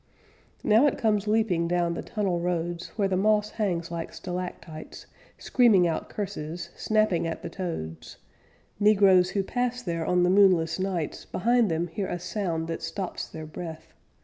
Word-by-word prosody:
Now 225 +7 +5
it 280 - 0
comes 210 -2 +1
leaping 210 -6 +2
down 175 -1 +1
the - - -4
tunnel 195 -5 -1
roads 175 0 -2
Where 200 -3 +1
the 190 - 0
moss 210 +2 +2
hangs 175 -6 -2
like 170 -1 -5
stalactites, 180 -3 -7 0.3
Screaming 220 -9 +4
out 165 - -3
curses, 170 -4 -5
snapping 215 -6 +1
at 165 - -5
the - - -5
toads; 160 - -6 0.6
Negroes 195 -3 +5
who 195 - +2
pass 245 +3 -2
there 170 -4 -2
on 180 +2 +2
the 180 - +3
moonless 185 -4 +4
nights 185 -5 -3
Behind 235 +1 +2
them 165 +1 0
hear 185 +3 -4
a - - -3
sound 175 -3 -3
that 165 0 -4
stops 175 +3 -4
their 155 -1 -8
breath. 160 0 -8
180 Hz, 160 wpm, -27 LUFS, 170-210 Hz, 0.6 s, Now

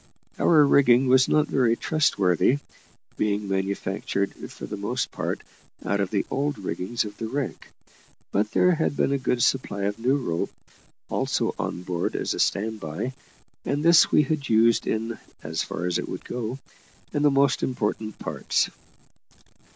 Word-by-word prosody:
Our 155 -3 +6
rigging 130 -2 +5
was 130 0 +5
not 150 -1 +3
very 120 -4 +2
trustworthy, 115 - +2 0.6
being 105 -1 0
manufactured, 95 0 -2 0.2
for - - -8
the - - -5
most - - -2
part, - - -3 0.4
out 100 - 0
of 100 -2 0
the 100 -2 0
old 145 0 -1
rigging 95 +3 -5
of 105 0 -8
the 115 - -3
wreck; 135 +2 -4 0.6
but 105 +2 +1
there 180 +10 +4
had 160 -3 -1
been - - +2
a 140 - +1
good 125 -2 0
supply 100 -6 0
of 100 +2 -2
new 130 +4 +2
rope 85 -11 -2 0.6
also - - 0
on 90 - -3
board, 90 -2 -2
as - - -1
a - - -5
stand 110 +2 0
by, 80 +10 -4 0.5
and 145 +3 -1
this 170 -1 +6
we 150 - +5
had 145 -1 -2
used 115 +1 +4
in, 115 +1 -2 0.2
as 80 +1 -2
far 90 - -4
as 90 - 0
it - - -5
would - - -6
go, 125 +1 -4 0.6
in 145 - 0
the 145 - +5
most 135 -1 +3
important 110 -3 -2
parts. - - -1
115 Hz, 165 wpm, -25 LUFS, 100-135 Hz, 0.6 s, Our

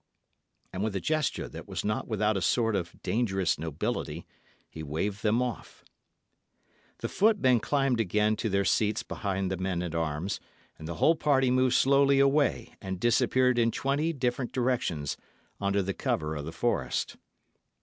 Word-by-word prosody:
And 95 +2 -2
with 110 -2 -2
a - - 0
gesture 155 - -1
that - - -10
was - - -4
not 105 +1 -1
without 110 -1 +1
a 95 - -1
sort 115 +2 +2
of 90 -3 -4
dangerous 95 -8 0
nobility, 80 0 -3 0.4
he 80 - -9
waved 80 +7 -3
them 110 +3 +2
off. 120 -3 -6 1.2
The - - -1
footmen 190 - +3
climbed 135 -2 +1
again 105 +1 +2
to 110 - -1
their 100 0 +1
seats 105 +1 +1
behind 95 -2 -3
the 95 - -1
men 90 -1 -2
at 85 -2 -4
arms, 80 +3 -2 0.4
and 80 - -7
the 85 - -4
whole 155 - +4
party 135 -4 +2
moved 130 0 +3
slowly 140 0 +4
away 140 -3 +2
and 95 -3 -5
disappeared 125 +2 +3
in 115 0 +3
twenty 140 +7 0
different 125 -3 -2
directions, 120 - -1 0.4
under 100 0 +1
the 95 +1 -2
cover 75 -3 -2
of 75 -1 -5
the 80 - -5
forest. 80 - -1
105 Hz, 160 wpm, -28 LUFS, 90-125 Hz, 1.2 s, whole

